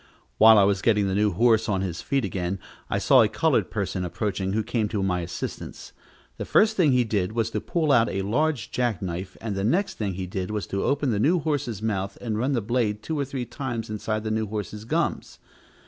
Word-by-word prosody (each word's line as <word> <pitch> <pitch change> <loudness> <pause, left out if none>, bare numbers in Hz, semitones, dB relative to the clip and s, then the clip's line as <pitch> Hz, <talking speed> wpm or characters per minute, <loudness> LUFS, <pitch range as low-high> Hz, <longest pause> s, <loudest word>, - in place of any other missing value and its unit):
While 110 0 +8
I 100 - +6
was 100 -1 +2
getting 105 -3 +3
the 95 - -1
new 105 +1 +2
horse 115 +3 +3
on 95 -2 +1
his 90 -3 -3
feet 135 -4 0
again, 95 0 -2 0.3
I - - 0
saw - - +5
a - - +5
colored - - +1
person 90 - -2
approaching, 95 +2 -2
who 110 +1 0
came 110 0 -1
to 105 -2 -2
my 90 -2 0
assistance. 85 0 -6 0.4
The - - -3
first 220 +1 +3
thing 165 -8 +4
he 125 -1 +4
did 105 -3 -1
was 115 -1 -1
to - - -2
pull 160 -4 0
out 115 -4 +4
a 95 0 -2
large 140 +6 0
jack 120 -7 -1
knife, 90 +1 -5
and 110 -3 -4
the 95 - -2
next 180 - 0
thing 100 -4 -2
he 95 0 -4
did 90 0 -4
was 105 -1 -3
to 100 - 0
open 140 -2 +1
the 105 - 0
new 160 - +3
horse's 145 - -2
mouth 100 -3 -2
and 115 -3 -3
run 130 +6 0
the 120 - +1
blade 110 -1 -1
two 160 -2 -3
or 140 - 0
three 130 -2 -4
times 120 -5 -5
inside 110 0 -2
the 110 - -2
new 110 0 -1
horse's 105 +1 -5
gums. - - -2
110 Hz, 230 wpm, -25 LUFS, 95-120 Hz, 0.4 s, While